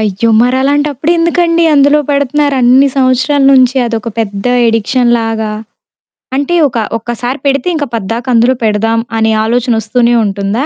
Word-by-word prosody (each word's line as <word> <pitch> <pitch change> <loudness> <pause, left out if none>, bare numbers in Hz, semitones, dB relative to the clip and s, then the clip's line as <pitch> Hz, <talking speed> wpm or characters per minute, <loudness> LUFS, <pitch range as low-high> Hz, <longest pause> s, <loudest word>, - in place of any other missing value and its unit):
అయ్యో! 215 +1 -1
మరలాంటప్పుడెందుకండి? 300 +6 0
అందులో 285 +1 +4
పెడుతున్నారు 285 +1 0
అన్ని 255 +3 +4
సంవత్సరాల 260 +2 +1
నుంచి 260 0 +3
అదొక 230 -1 -4
పెద్ద 200 -3 -4 0.2
ఎడిక్షన్‌లాగా? 225 -1 0 0.9
అంటే 285 +5 -1
ఒక 240 - -6 0.2
ఒక్కసారి 240 +4 -5
పెడితే 275 +5 -1
ఇంక 295 - -2
పద్దాక 225 +4 -4
అందులో 235 +3 +3
పెడదాం 225 +1 0 0.2
అనే 220 0 +1
ఆలోచనొస్తూనే 235 0 0
ఉంటుందా? 200 +6 -2
245 Hz, 120 wpm, -11 LUFS, 225-280 Hz, 0.9 s, అందులో